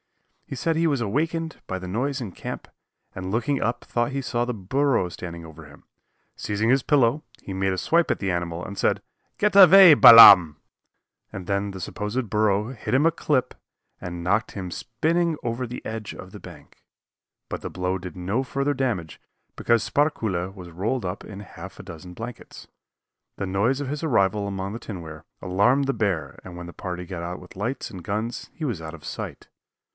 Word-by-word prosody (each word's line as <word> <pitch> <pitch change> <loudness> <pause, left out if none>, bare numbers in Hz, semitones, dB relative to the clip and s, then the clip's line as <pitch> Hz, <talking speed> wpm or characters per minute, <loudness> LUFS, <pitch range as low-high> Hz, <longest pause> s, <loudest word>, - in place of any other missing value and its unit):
He - - -6
said 165 +5 -1
he 165 +1 +2
was 145 -4 +1
awakened 160 +9 -2
by 95 - -3
the 90 - -8
noise 130 +9 -2
in 115 -7 -6
camp, - - -7 0.5
and 95 0 -5
looking 120 +6 0
up 115 +2 -2
thought 120 +4 -1
he 135 0 -2
saw 120 -2 -1
the 125 0 -2
burro 125 +2 0
standing 85 -1 -8
over 80 0 -12
him. 70 - -17 0.5
Seizing 105 +2 -1
his 130 +1 +3
pillow 145 0 +2 0.2
he 95 - -7
made 95 0 0
a 95 - -2
swipe 165 - +2
at - - 0
the 95 -2 -1
animal, 85 0 -3
and 100 - -8
said, - - +1 0.4
"Get 210 -1 +1
away, 190 -2 +10
Balaam!" 95 - +10 0.7
and 95 -2 -7
then 100 +1 -1
the 95 - -8
supposed 105 +6 -4
burro 105 +2 +1
hit 120 - -5
him 140 +4 +3
a 165 - +5
clip 140 -5 -1 0.5
and 85 -1 -6
knocked 100 +5 0
him 95 -3 -6
spinning 160 - -1
over 120 +2 -2
the 125 +1 -8
edge 110 -2 -5
of - - -11
the - - -10
bank, - - -14 0.6
but - - -5
the - - -5
blow 90 +1 -2
did 90 -2 -9
no 100 +9 -1
further 140 +2 -1
damage 120 - -3 0.3
because 115 -2 +1
Sparkuhle 110 - 0
was 90 -3 -11
rolled 105 +7 -2
up 90 +2 -5
in 100 -2 -9
half 95 -1 -11
a - - -8
dozen 90 -1 -10
blankets. 115 +5 -9 0.7
The - - -3
noise 100 +8 0
of 145 - -4
his 150 +3 -4
arrival 105 -7 +1
among 100 0 -4
the 115 - -6
tinware 80 -9 -8 0.2
alarmed 115 +10 +2
the 135 - 0
bear 85 - -2
and 90 -1 -10
when 90 - -7
the 85 - -10
party 90 -1 -6
got 85 -1 -6
out 90 +1 -5
with 90 - -15
lights 115 +8 -4
and 90 -3 -9
guns 110 +5 -4
he 160 - -6
was 115 - -3
out 80 0 -7
of 80 - -14
sight. - - -7
105 Hz, 195 wpm, -24 LUFS, 90-130 Hz, 0.7 s, away